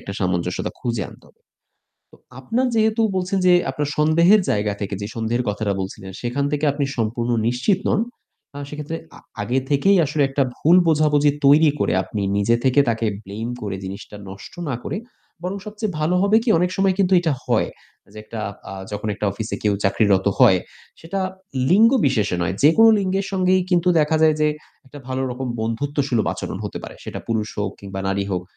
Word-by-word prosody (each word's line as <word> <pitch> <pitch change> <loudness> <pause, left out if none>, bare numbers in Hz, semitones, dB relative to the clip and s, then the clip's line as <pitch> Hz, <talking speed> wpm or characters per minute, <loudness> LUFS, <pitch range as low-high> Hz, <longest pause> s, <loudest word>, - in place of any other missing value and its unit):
একটা 100 - -7
সামঞ্জস্যতা 90 -1 -1
খুঁজে 115 -4 -2
আনতে - - -16
হবে। - - -28 0.7
তো - - -17 0.2
আপনার 235 - 0
যেহেতু 220 0 +2 0.2
বলছেন 185 +1 0
যে 180 - +6 0.2
আপনার 145 +2 -3
সন্দেহের 170 +7 +5
জায়গা 105 0 0
থেকে 100 0 -3
যে 100 - -2
সন্দেহের 115 +2 -1
কথাটা 105 0 -1
বলছিলেন 95 0 -6
সেখান 125 +4 -1
থেকে 150 +1 0
আপনি 145 0 -1
সম্পূর্ণ 115 +2 -1 0.2
নিশ্চিত 125 - +1
নন। - - +2 0.6
আ - - -5
সেক্ষেত্রে 150 +2 -5 0.2
আ - - -12 0.2
আগে 125 +2 0
থেকেই 195 +8 +4
আসলে 145 +1 0
একটা 135 +1 0
ভুল 165 +4 +4
বোঝাবুঝি 150 -2 +3 0.2
তৈরি 150 +2 +6
করে - - +1
আপনি 100 +3 -4
নিজে 100 +3 +2
থেকে 130 +1 +4
তাকে 115 -1 0 0.2
blame 110 +5 -5
করে 100 -2 -3
জিনিসটা 100 +2 -8
নষ্ট 95 - -10
না 135 - -1
করে - - -4 0.5
বরং 185 +2 -3
সবচেয়ে 210 -1 -4
ভালো 155 +4 +1
হবে 200 +2 +4
কি, 240 - -4
অনেক 180 +1 +1
সময় 195 -1 +2
কিন্তু 195 -1 +2
এটা 165 -3 0
হয় - - +1 0.4
যে 110 - -11
একটা 110 +1 -7 0.3
আ - - -6 0.2
যখন 105 +1 -4
একটা 105 - -3
অফিসে 110 +3 -4
কেউ 105 -1 +2
চাকরিরত 95 -1 +2
হয় 95 - +6 0.4
সেটা 180 +4 -4 0.5
লিঙ্গবিশেষে 180 - +3
নয় 90 +2 -1
যেকোনো 225 +10 +7
লিঙ্গের 195 0 -1
সঙ্গেই 185 0 +3
কিন্তু 180 0 +3
দেখা 150 +1 +2
যায় 155 -1 +5
যে 150 - +4 0.4
একটা 145 +2 -11
ভালো 130 0 -2
রকম 130 +1 -4
বন্ধুত্বসুলভ 130 +2 -1
আচরণ - - -5
হতে - - -5
পারে। - - -9
সেটা - - -6
পুরুষ 110 -2 -1
হোক 100 -1 -1
কিংবা 95 -1 -6
নারী 100 0 0
হোক। 90 -2 -1
135 Hz, 185 wpm, -21 LUFS, 105-175 Hz, 0.7 s, যেকোনো